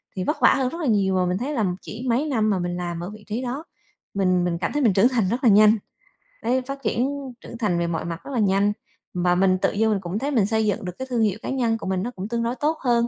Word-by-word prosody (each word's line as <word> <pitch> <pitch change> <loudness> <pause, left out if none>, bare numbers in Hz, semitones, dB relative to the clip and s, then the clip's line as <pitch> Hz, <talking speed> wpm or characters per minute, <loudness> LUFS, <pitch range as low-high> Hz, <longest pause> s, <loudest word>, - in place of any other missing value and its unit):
thì 185 - -2
vất 300 - -2
vả - - +7
hơn 260 -2 0
rất 335 +4 -6
là 295 - -1
nhiều. 195 -4 +2
Mà 180 -1 +2
mình 180 +1 0
thấy 275 +7 -3
là 220 -6 +1 0.2
chỉ 235 +4 -8
mấy 255 +6 +2
năm 225 -7 +1
mà 190 -3 +1
mình 175 0 -2
làm 175 -1 -4
ở 180 - -5
vị 210 0 -12
trí 230 +4 -2
đó, 260 +6 -4 0.5
mình 185 -2 +2
mình 170 -1 -1
cảm - - -1
thấy 295 - 0
mình 215 -5 +4
trưởng 215 +7 +5
thành 225 -7 +1
rất 245 +4 -2
là 235 - +6
nhanh. 215 +2 +6 0.7
Đấy 255 +2 +1
phát 275 +1 -7
triển 245 +4 +1 0.3
trưởng 235 - -9
thành 180 -6 +1
về 170 - 0
mọi 165 -1 -2
mặt 170 +1 -5
rất 280 - -8
là 245 - 0
nhanh 200 0 +3 0.4
và 180 0 +2
mình 185 0 +3
tự - - +1
dưng 220 +1 +2
mình 195 -2 0
cũng 185 +4 -3
thấy 285 +3 -2
mình 225 -7 +3
xây 220 0 +1
dựng 205 0 -1
được 180 - -3
cái 260 - -4
thương 235 -2 +1
hiệu 210 -1 +1
cá - - -5
nhân 235 -4 +1
của - - -7
mình 190 -1 0
nó 245 - -3
cũng 195 -2 -6
tương 235 0 -1
đối 235 +2 -1
tốt 310 +3 0
hơn, 235 -2 +2
215 Hz, 305 wpm, -23 LUFS, 190-245 Hz, 0.7 s, vả